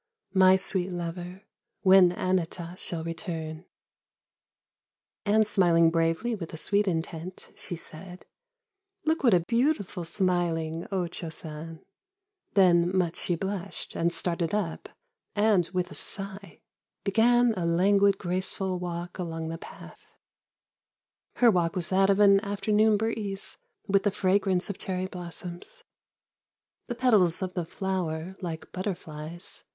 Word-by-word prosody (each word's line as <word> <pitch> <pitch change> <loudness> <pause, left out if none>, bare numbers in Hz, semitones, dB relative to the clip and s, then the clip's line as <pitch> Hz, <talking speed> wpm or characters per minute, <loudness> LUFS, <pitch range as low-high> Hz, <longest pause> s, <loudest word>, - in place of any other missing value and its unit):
My 190 -1 +7
sweet 190 -1 -1
lover, 175 +2 -5 0.4
when 190 -1 +7
Anata. 180 -1 -2
shall 170 -3 -5
return! 165 -1 -5 0.8
" - - -67
And 215 +1 +4
smiling 170 -5 +4
bravely 165 +8 +1
with 175 -7 -5
a - - -7
sweet 205 +5 +1
intent, 165 +1 -4
she 175 - -7
said: 180 +3 -9 0.4
" 395 -3 -49
Look 320 0 +1
what 235 -7 +6
a 175 - +3
beautiful 230 - 0
smiling 170 -2 -1
O 185 -2 0
Cho 170 -1 -6
San! 160 +1 -8 0.3
" 395 -1 -52
Then 175 -3 +5
much 175 -2 +1
she 175 - -1
blushed, 195 +1 -4
and 170 +1 +1
started 170 +2 -2
up, 190 -6 -3 0.5
and, 205 -4 +3
with 180 -1 -1
a - - -7
sigh. 195 0 -5 0.4
Began 235 +3 +4
a 180 -5 -2
languid, 195 +3 +4
graceful 185 0 -2
walk 175 0 -5
along 165 -2 -4
the 165 0 -5
path: - - -13 1.2
Her 240 -2 +6
walk 170 -4 +1
was 175 -2 -1
that 195 +1 +3
of 200 0 +3
an 200 -1 +7
afternoon 210 +1 +2
breeze 205 -3 -3 0.3
With 195 -1 +3
the 205 - +2
fragrance 190 -1 +1
of 200 - -5
cherry 185 -1 -2
blossoms. 180 - -8 1.0
The 240 - -3
petals 210 -9 +3
of 185 -1 -4
the 175 -3 -2
flower, 180 -1 -3
like 165 -3 -6
butterflies. 175 -3 -6
185 Hz, 135 wpm, -28 LUFS, 170-200 Hz, 1.2 s, My